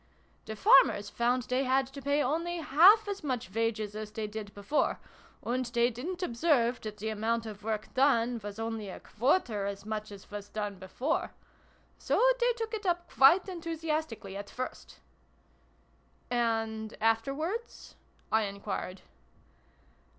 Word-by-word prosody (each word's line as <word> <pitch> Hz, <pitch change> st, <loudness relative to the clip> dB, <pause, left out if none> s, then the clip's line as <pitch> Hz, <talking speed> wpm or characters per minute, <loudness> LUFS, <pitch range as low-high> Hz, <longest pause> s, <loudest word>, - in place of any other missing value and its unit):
The 220 Hz, -, -5 dB
farmers 205 Hz, -2 st, +5 dB
found 245 Hz, +1 st, +1 dB
they 255 Hz, +2 st, 0 dB
had 265 Hz, +1 st, +2 dB
to 280 Hz, -, -7 dB
pay 285 Hz, +2 st, +1 dB
only 335 Hz, +6 st, -1 dB
half 350 Hz, +8 st, +6 dB
as 400 Hz, -3 st, -4 dB
much 250 Hz, -8 st, -3 dB
wages 220 Hz, -2 st, -1 dB
as 215 Hz, -1 st, -5 dB
they 215 Hz, 0 st, -4 dB
did 210 Hz, -1 st, -6 dB
before, 205 Hz, +9 st, 0 dB, 0.4 s
and 250 Hz, +2 st, 0 dB
they 240 Hz, 0 st, +2 dB
didn't 345 Hz, +11 st, -5 dB
observe 245 Hz, -4 st, +2 dB
that 215 Hz, -1 st, -6 dB
the 215 Hz, +2 st, -3 dB
amount 225 Hz, +2 st, -1 dB
of 210 Hz, -2 st, -8 dB
work 215 Hz, 0 st, -3 dB
done 245 Hz, -3 st, +2 dB
was 205 Hz, 0 st, -6 dB
only 225 Hz, -2 st, -4 dB
a -, -, -8 dB
quarter 225 Hz, -, 0 dB
as 200 Hz, 0 st, -6 dB
much 215 Hz, -1 st, -4 dB
as 200 Hz, 0 st, -12 dB
was 205 Hz, 0 st, -7 dB
done 205 Hz, -2 st, -4 dB
before: 245 Hz, -, -2 dB, 0.6 s
so -, -, +1 dB, 0.2 s
they -, -, +3 dB
took 455 Hz, -1 st, -5 dB
it 420 Hz, -3 st, -3 dB
up 345 Hz, -1 st, -1 dB
quite 305 Hz, +8 st, +6 dB
enthu 335 Hz, -3 st, -5 dB
siastically, 305 Hz, -11 st, -3 dB
at 200 Hz, 0 st, -6 dB
first" 255 Hz, 0 st, -7 dB, 0.7 s
" -, -, -36 dB
And 225 Hz, -2 st, -1 dB
afterwards? 275 Hz, -, -1 dB, 0.2 s
" -, -, -35 dB
I 220 Hz, 0 st, +3 dB
enquired. 200 Hz, -2 st, -5 dB
235 Hz, 155 wpm, -30 LUFS, 215-295 Hz, 0.7 s, half